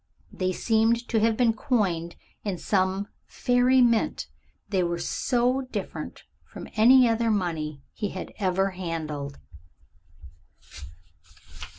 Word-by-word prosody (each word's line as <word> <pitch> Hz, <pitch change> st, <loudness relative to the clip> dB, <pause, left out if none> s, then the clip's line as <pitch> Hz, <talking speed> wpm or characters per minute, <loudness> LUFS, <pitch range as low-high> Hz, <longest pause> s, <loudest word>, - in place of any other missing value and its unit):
They 185 Hz, -1 st, -1 dB
seemed 225 Hz, +4 st, +1 dB
to 225 Hz, -, +2 dB
have 225 Hz, 0 st, +2 dB
been 240 Hz, -3 st, +3 dB
coined 195 Hz, -, -1 dB, 0.3 s
in 200 Hz, -4 st, -2 dB
some 190 Hz, +1 st, 0 dB, 0.2 s
fairy 250 Hz, +1 st, +3 dB
mint; 235 Hz, -2 st, +1 dB, 0.4 s
they 190 Hz, -3 st, +1 dB
were 170 Hz, -1 st, -1 dB
so 250 Hz, +7 st, 0 dB
different -, -, -6 dB, 0.2 s
from -, -, -10 dB
any 250 Hz, +3 st, +7 dB
other 230 Hz, 0 st, +1 dB
money 160 Hz, -8 st, -2 dB
he 205 Hz, -2 st, -3 dB
had 185 Hz, -, -7 dB
ever 195 Hz, 0 st, +1 dB
handled. 155 Hz, -6 st, -5 dB
205 Hz, 110 wpm, -26 LUFS, 180-235 Hz, 0.4 s, any